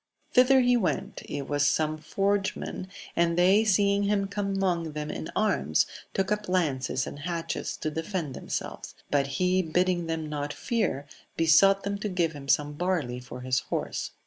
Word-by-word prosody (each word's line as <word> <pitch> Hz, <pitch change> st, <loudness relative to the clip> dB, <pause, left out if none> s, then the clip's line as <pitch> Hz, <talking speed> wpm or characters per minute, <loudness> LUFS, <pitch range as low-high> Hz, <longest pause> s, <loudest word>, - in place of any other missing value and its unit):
Thither 260 Hz, +1 st, +6 dB
he 245 Hz, 0 st, +4 dB
went; 215 Hz, -7 st, -1 dB
it 145 Hz, -1 st, -4 dB
was 145 Hz, 0 st, +1 dB
some 155 Hz, +1 st, +1 dB
forgemen, 195 Hz, +1 st, -1 dB, 0.3 s
and 170 Hz, 0 st, +2 dB
they 190 Hz, +5 st, +5 dB
seeing 200 Hz, -1 st, +3 dB
him 200 Hz, 0 st, +1 dB
come 200 Hz, 0 st, -2 dB
among 175 Hz, -5 st, 0 dB
them 150 Hz, 0 st, -4 dB
in -, -, -5 dB
arms, 75 Hz, +3 st, +2 dB, 0.3 s
took 195 Hz, +1 st, 0 dB
up 210 Hz, -2 st, -1 dB
lances 135 Hz, -8 st, 0 dB
and 145 Hz, -, -7 dB
hatchets 165 Hz, +1 st, -3 dB
to 155 Hz, -, -3 dB
defend 160 Hz, -2 st, -3 dB
themselves; -, -, -5 dB, 0.2 s
but 140 Hz, -1 st, +2 dB
he 185 Hz, 0 st, +3 dB
bidding 175 Hz, +1 st, +1 dB
them 160 Hz, -1 st, -2 dB
not 145 Hz, -1 st, -3 dB
fear, 210 Hz, -, -1 dB, 0.3 s
besought 195 Hz, +5 st, +5 dB
them 200 Hz, 0 st, -2 dB
to 210 Hz, -, -2 dB
give 175 Hz, -3 st, +1 dB
him 140 Hz, -2 st, -9 dB
some 145 Hz, +1 st, +2 dB
barley 150 Hz, -7 st, -1 dB
for 125 Hz, 0 st, -9 dB
his 130 Hz, 0 st, +1 dB
horse. -, -, -3 dB
175 Hz, 170 wpm, -27 LUFS, 150-195 Hz, 0.3 s, Thither